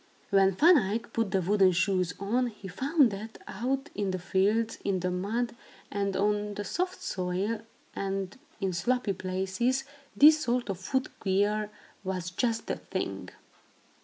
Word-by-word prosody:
When 195 -1 +5
Van 330 - +7
Eyck 220 +3 -3
put 225 -3 0
the 190 0 +1
wooden 190 0 +4
shoes 185 -1 +1
on, 235 +6 +1
he 210 -4 -9
found 270 - +3
that 215 +3 -7
out 260 +7 -2
in 200 -1 -1
the 185 - -1
fields, 200 +5 +1
in 195 -2 0
the 180 0 0
mud, 225 +6 -1 0.4
and 200 -1 -1
on 210 +1 0
the 205 - -3
soft 365 - -2
soil, 185 +4 -2 0.3
and 195 0 -3 0.2
in 190 -2 -1
sloppy 240 +3 0
places, 190 +8 -1 0.3
this 305 +1 +7
sort 245 -3 0
of 185 - -6
foot 260 +7 -1
gear 205 +2 +1 0.3
was 185 -2 -3
just 230 +4 0
the - - -2
thing. - - -4
205 Hz, 155 wpm, -29 LUFS, 190-235 Hz, 0.4 s, Van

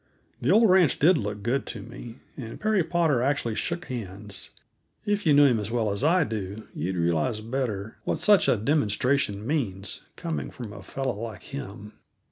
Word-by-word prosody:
The 125 - 0
old 220 +5 +6
ranch 185 -7 +5
did 175 +6 +5
look 105 -5 -3
good 125 +5 0
to 105 -4 -5
me, 120 +1 -10
and 115 -5 -7
Perry 215 -4 +2
Potter 160 -7 +2
actually 130 -4 0
shook 170 +9 -3
hands; 100 -4 -6 0.6
if 205 -3 0
you 150 - +6
knew 145 0 +7
him 125 -5 +4
as 105 0 -4
well 115 -3 0
as 100 +6 -1
I 170 +3 +4
do 105 -4 -5
you'd 90 +4 -3
realize 85 +5 +1
better 110 -3 -3
what - - -1
such 205 -2 +5
a - - +4
demonstration 110 -3 +1
means, 110 -9 -2
coming 165 -2 -4
from 115 -4 -8
a 100 - -9
fellow 135 -2 -3
like 110 -5 -6
him. 105 -6 -8
120 Hz, 180 wpm, -26 LUFS, 105-150 Hz, 0.6 s, knew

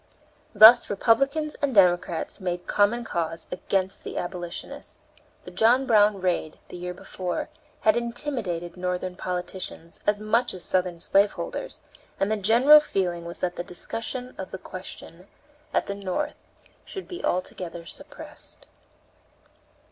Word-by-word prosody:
Thus 220 +4 +9
Republicans 275 +9 +2
and 280 -4 0
Democrats 175 -3 +3
made 180 -1 -3
common 215 +4 +2
cause 165 -6 -3
against 190 +1 -1
the - - -6
abolitionists. 175 -1 -6 0.4
The 180 - -10
John 230 +8 +4
Brown 210 -4 +4
raid, 180 -4 -1
the - - -9
year 180 0 -5
before, 180 0 -4 0.3
had 215 - +4
intimidated 235 - -2
Northern 180 0 -3
politicians 180 -2 -5
as 205 0 +3
much 215 +1 +1
as 180 - -6
Southern 180 -2 0
slaveholders, 200 - 0 0.4
and 195 +2 +1
the 220 - +1
general 240 +9 +7
feeling 180 - -2
was 170 - -7
that 175 - -5
the - - -2
discussion 230 +8 -5
of 190 - -5
the - - -6
question 185 -1 -10 0.4
at - - +1
the 200 - -3
North 195 -2 -3 0.5
should 385 - -8
be 355 - -7
altogether 175 -2 -3
suppressed. - - -10
190 Hz, 135 wpm, -26 LUFS, 180-230 Hz, 0.5 s, Thus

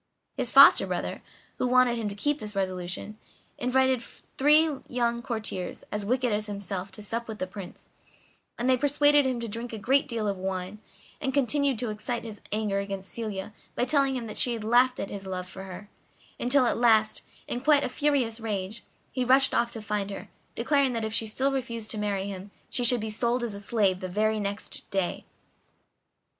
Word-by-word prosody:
His - - 0
foster - - +8
brother, - - -3 0.4
who 255 - +1
wanted 250 -1 +4
him 225 -3 -2
to 200 - -7
keep 290 +7 0
this 210 -1 -7
resolution, 185 +2 -3 0.4
invited 260 0 +2
three 300 +6 +2 0.2
young 235 -1 0
courtiers, 220 -7 -4
as 210 0 -2
wicked 250 -1 +1
as 210 +1 -1
himself 200 -1 -4
to 210 - -7
sup 230 +3 -3
with 220 -1 -6
the 185 - -2
Prince, 185 -1 -10 0.7
and 240 - -1
they 260 -1 +4
persuaded 290 +1 +4
him 255 -2 -1
to 230 - -3
drink 230 +3 -5
a - - -3
great 265 +7 +2
deal 225 -3 -2
of 200 -1 -1
wine, 190 +2 -4 0.4
and 265 0 -1
continued 280 -1 +2
to 230 -1 -1
excite 215 +3 -3
his 220 -3 -8
anger 210 -2 0
against 195 -1 -5
Celia 215 -3 -4 0.2
by 245 - +1
telling 275 0 +2
him 245 -2 -3
that 215 -1 -6
she 245 - +3
had 225 -2 -4
laughed 245 +3 +4
at 195 - -4
his 195 -1 -6
love 180 -1 -4
for 190 +1 -9
her; 190 +2 -9 0.5
until 250 +2 +3
at - - +1
last, 220 -2 +3 0.3
in 245 - -3
quite 290 +1 +4
a - - 0
furious 255 -4 0
rage, 210 -1 -4 0.3
he 255 - -1
rushed 260 +2 +4
off 235 0 +1
to 225 - -6
find 210 -1 -2
her, 195 - -7 0.3
declaring 280 -3 +2
that 225 -1 -2
if 220 - -4
she 225 0 +1
still 265 +6 0
refused 235 -5 -3
to 215 - -2
marry 200 -2 -1
him 195 0 -7 0.2
she 245 - 0
should 240 -1 +4
be 220 0 -3
sold 235 +3 0
as 230 -3 -3
a 200 - -5
slave 200 -3 +1
the 185 - -4
very 215 +3 +1
next 205 +1 -5
day. 190 -3 -2
225 Hz, 200 wpm, -27 LUFS, 200-250 Hz, 0.7 s, foster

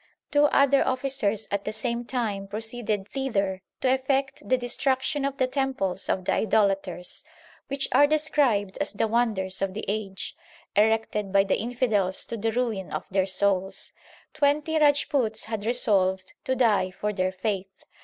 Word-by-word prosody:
Two 290 0 +5
other 280 -1 +4
officers 255 -5 -1
at 200 0 -1
the 215 - -3
same 235 +2 -2
time 215 -6 -2
proceeded 215 -1 -3
thither 200 -9 -1 0.2
to 260 -1 +3
effect 270 +1 0
the 255 - +4
destruction 265 +3 0
of 275 0 -2
the 260 - +3
temples 255 -8 -1
of 185 - 0
the - - +2
idolaters, 195 -4 +1 0.4
which 275 0 -1
are 290 - +6
described 285 -10 +1
as - - -1
the 215 +2 0
wonders 215 -5 0
of 195 -1 -1
the 215 - -4
age, 200 -2 -4 0.4
erected 210 -1 +2
by 195 0 +5
the 195 - 0
infidels 220 -6 0
to 235 - -5
the 225 +1 -1
ruin 220 -5 -2
of - - -4
their 190 0 +2
souls. 195 0 0 0.4
Twenty 300 +2 +2
Rajputs 285 -6 +2
had 220 -1 -4
resolved 190 -6 +1
to 260 - +1
die 215 -7 +3
for 210 +3 -3
their 185 -1 0
faith. 190 0 -4
220 Hz, 155 wpm, -26 LUFS, 195-260 Hz, 0.4 s, are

